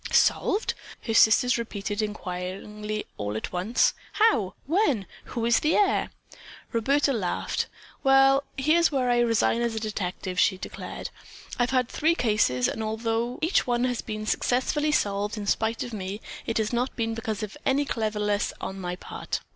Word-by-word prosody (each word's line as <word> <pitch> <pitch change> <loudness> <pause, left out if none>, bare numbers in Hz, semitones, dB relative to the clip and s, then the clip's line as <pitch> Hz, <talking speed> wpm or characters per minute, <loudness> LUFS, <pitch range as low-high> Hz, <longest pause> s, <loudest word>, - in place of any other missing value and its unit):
"Solved?" 415 +4 +3 0.3
her 225 - -2
sisters 235 +3 +5
repeated 210 -2 -3
inquiringly 210 +1 -4
and 215 - -2
all 105 +1 -3
at - - -5
once. 185 +7 +2 0.2
"How? 240 - +3
When? 295 - +2 0.2
Who 230 -2 -3
is 235 -1 +4
the 310 - +2
heir?" 405 -2 +2 0.6
Roberta 275 +5 +2
laughed. 195 -7 -1 0.4
"Well, 270 0 +6 0.2
here's 315 +5 +3
where 255 -3 +1
I 240 - +3
resign 230 0 +2
as 235 -1 0
a - - -1
detective," 185 -4 -3
she 190 - +4
declared. - - -7 0.5
"I've 245 0 +2
had 255 -2 +2
three 320 +6 +1
cases 210 - +2
and 225 - -3
although 225 +2 -1
each 330 -3 +2
one 240 0 +1
has 250 -2 0
been 215 -1 -5
successfully 260 +7 +1
solved 205 -4 0
in 205 - -4
spite 220 +3 0
of 240 - -7
me, 195 0 -4 0.3
it 230 - 0
has 220 +1 0
not 245 +2 0
been 225 -1 -1
because 220 -2 -3
of 210 +3 -6
any 280 +2 +2
cleverness 210 -4 -1
on 195 0 -5
my 180 0 -3
part." - - -5
225 Hz, 165 wpm, -26 LUFS, 210-255 Hz, 0.6 s, Well